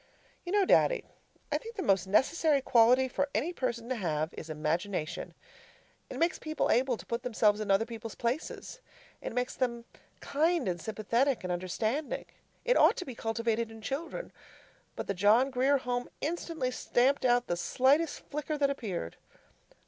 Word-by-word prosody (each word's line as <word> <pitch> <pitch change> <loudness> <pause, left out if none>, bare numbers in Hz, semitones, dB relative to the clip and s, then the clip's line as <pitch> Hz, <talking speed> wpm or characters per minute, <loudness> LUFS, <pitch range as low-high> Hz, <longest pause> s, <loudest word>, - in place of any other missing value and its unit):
You - - -2
know, 405 -1 +4
Daddy, - - +4 0.5
I - - +1
think 460 0 -10
that 390 - -3
the - - -6
most 190 -1 +3
necessary 285 - +3
quality 250 0 +5
for 280 +2 -1
any 295 +12 0
person 235 -6 -3
to 255 - 0
have 160 -5 -1
is 160 - -8
imagination. 155 +2 -2 0.7
It - - -6
makes 335 0 +1
people 310 0 -1
able 250 -1 +2
to - - -11
put 235 0 -3
themselves 215 -4 +2
in 215 -1 -4
other 195 +3 +4
people's 225 -1 -7
places. 260 - -3 0.4
It - - -4
makes 250 +1 -1
them 235 -2 -2 0.3
kind 325 - +1
and 175 -2 -2
sympathetic 230 - 0
and 180 -1 -1
understanding. 215 - -2 0.4
It - - +4
ought - - +5
to 365 - -4
be 260 - -6
cultivated 230 0 -1
in 225 0 -11
children. 320 - -4 0.6
But - - -4
the 200 - -1
John 215 +8 +4
Grier 265 +3 +3
Home 245 -1 -3
instantly 320 -4 -2
stamped 255 +2 +1
out 245 -1 +3
the 175 - -1
slightest 275 - +2
flicker 300 +1 -3
that 280 -1 +2
appeared. 190 - -4
245 Hz, 170 wpm, -30 LUFS, 215-285 Hz, 0.7 s, quality